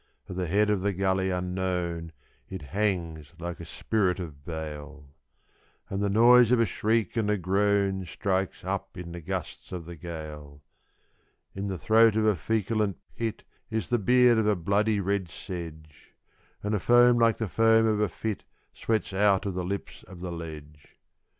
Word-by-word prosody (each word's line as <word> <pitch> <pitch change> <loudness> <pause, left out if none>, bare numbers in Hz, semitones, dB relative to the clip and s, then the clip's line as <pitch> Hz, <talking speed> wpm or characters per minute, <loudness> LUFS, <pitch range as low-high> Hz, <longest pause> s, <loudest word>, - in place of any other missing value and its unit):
At 90 - -7
the 90 -1 -2
head 105 +5 +2
of 100 -3 +1
the 100 +1 0
gully 95 0 +1
unknown 90 -2 -2 0.4
it 95 -5 -6
hangs 85 -7 -1
like 85 0 -6
a 85 - -7
spirit 95 +2 0
of 75 -6 -8
bale. 75 -2 -7 0.8
And 95 +1 -2
the 100 - +1
noise 120 +3 +6
of 125 - +4
a 115 - +4
shriek 110 +1 0
and 110 -2 +1
a 105 - +2
groan 95 +1 +1
strikes 95 +1 -2
up - - -4
in 85 -1 -7
the 85 0 -7
gusts 90 0 -5
of 90 -3 -5
the 85 +1 -8
gale. 75 -3 -8 0.9
In 100 +1 -4
the 95 -2 -3
throat 110 +3 +5
of 110 0 +2
a 105 -2 +4
feculent 105 +2 -1 0.2
pit 115 -2 -3 0.3
is 110 -5 -2
the 120 - +2
beard 125 +2 +5
of 110 - +1
a 105 - +3
bloody 100 +4 +1
red 100 -2 -1
sedge; 80 -5 -9 0.5
And 105 +1 -1
a 105 - +1
foam 120 +3 +5
like 115 -1 +4
the 110 - -2
foam 115 +2 +4
of 110 -2 +2
a 105 -2 +2
fit 105 +4 -4 0.3
sweats 110 -3 -1
out 100 0 +3
of 100 - -2
the 90 0 -2
lips 100 +3 -5
of 95 -2 -11
the 90 0 -5
ledge. 75 -3 -9
95 Hz, 175 wpm, -27 LUFS, 85-105 Hz, 0.9 s, noise